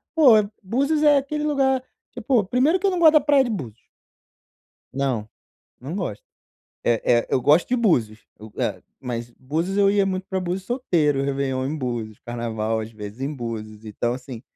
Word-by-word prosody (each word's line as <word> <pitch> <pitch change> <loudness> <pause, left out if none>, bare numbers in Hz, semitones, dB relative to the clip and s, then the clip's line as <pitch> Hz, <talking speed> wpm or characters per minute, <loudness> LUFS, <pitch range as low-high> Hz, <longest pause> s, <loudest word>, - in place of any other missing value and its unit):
pô, 290 -7 +7 0.3
Búzios 280 +10 0
é 295 -1 +6
aquele 295 +2 -2
lugar, 270 -3 +1 0.3
tipo, 235 -2 +1
primeiro 275 - +2
que 400 - -2
eu - - +2
não 360 - -1
gosto 320 -2 +7
da 305 - +6
praia 285 -2 +4
de 240 - -3
Búzios. 125 - -6 1.1
Não, 130 -6 -1 0.5
não 140 +7 -6
gosto. 180 - -4 0.6
Eh 120 -1 +2
eh, 120 -1 +2
eu 130 - +1
gosto 150 +6 +4
de 250 - +1
Búzios, 120 - +1
eu 110 0 -11
hã. - - -2 0.2
Mas 120 -2 -5
Búzios, 165 +9 -2
eu 200 -1 +4
ia 200 -1 +3
muito 185 -1 -2
para 190 - -2
Búzios 180 +1 -3
solteiro, 165 - +1
réveillon 135 -1 -1
em 150 - -3
Búzios, 120 -5 -4
carnaval, 115 -2 -3
às 110 +1 -6
vezes, 105 +1 -9
em 140 +3 -2
Búzios, 110 -4 -6
então 120 +3 -2
assim 125 -2 -8
145 Hz, 180 wpm, -23 LUFS, -, 1.1 s, pô